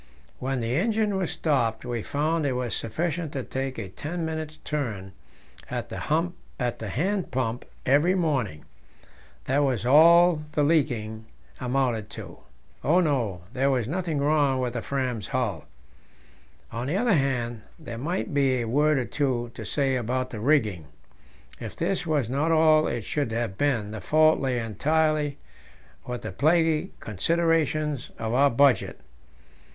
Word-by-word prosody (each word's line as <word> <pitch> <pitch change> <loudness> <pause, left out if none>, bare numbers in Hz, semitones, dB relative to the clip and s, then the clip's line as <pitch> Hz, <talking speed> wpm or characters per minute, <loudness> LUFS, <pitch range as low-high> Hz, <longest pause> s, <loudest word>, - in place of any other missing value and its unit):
When 130 -1 -2
the 115 +2 -1
engine 215 +1 +1
was 190 -3 -1
stopped, 120 -8 0
we 120 -2 -2
found 155 +6 0
it 135 - 0
was 125 -2 -2
sufficient 160 +6 -2
to 135 -3 -3
take 130 +1 -4
a 105 -4 -4
ten 165 - -4
minutes' 155 -1 -4
turn 110 -11 -3 0.6
at - - -4
the - - -5 0.6
hand 130 - -1
pump 125 -2 -2 0.2
every 150 +8 +4
morning; 130 - -1 0.8
that 135 +2 +2
was 130 -6 +1
all 165 +4 +6
the 150 - +2
"leaking" 115 -8 0 0.3
amounted 125 -4 0
to. - - -9 0.4
Oh 170 +6 +4
no! 125 - 0
there 135 +1 +2
was 125 -5 +1
nothing 170 0 -2
wrong 145 -2 +2
with 125 -2 -1
the 120 - -3
Fram's 125 -6 -2
hull. 120 - -2 1.1
On 120 +2 -4
the 160 +7 0
other 235 0 +3
hand, 125 - 0 0.2
there 120 -8 -7
might 170 +5 -2
be 135 -2 +3
a 115 - -2
word 150 +5 +3
or 130 - 0
two 120 -4 -1
to - - -7
say 135 -2 0
about 130 +1 -1
the 110 - -5
rigging; 110 - +1 0.7
if - - -7
this 175 +1 -1
was 145 -7 +1
not 140 +6 0
all 155 -1 +5
it 115 -4 -3
should 145 -6 -1
have 115 -4 -2
been, 115 -5 0
the 110 - -6
fault 155 +1 +4
lay 130 -2 0
entirely 150 +5 0 0.7
with 125 -1 -5
the - - -4
plaguy 160 - +2
considerations 155 - 0
of 110 0 -3
our 140 +3 +5
budget. 130 -3 +3
135 Hz, 150 wpm, -26 LUFS, 120-155 Hz, 1.1 s, all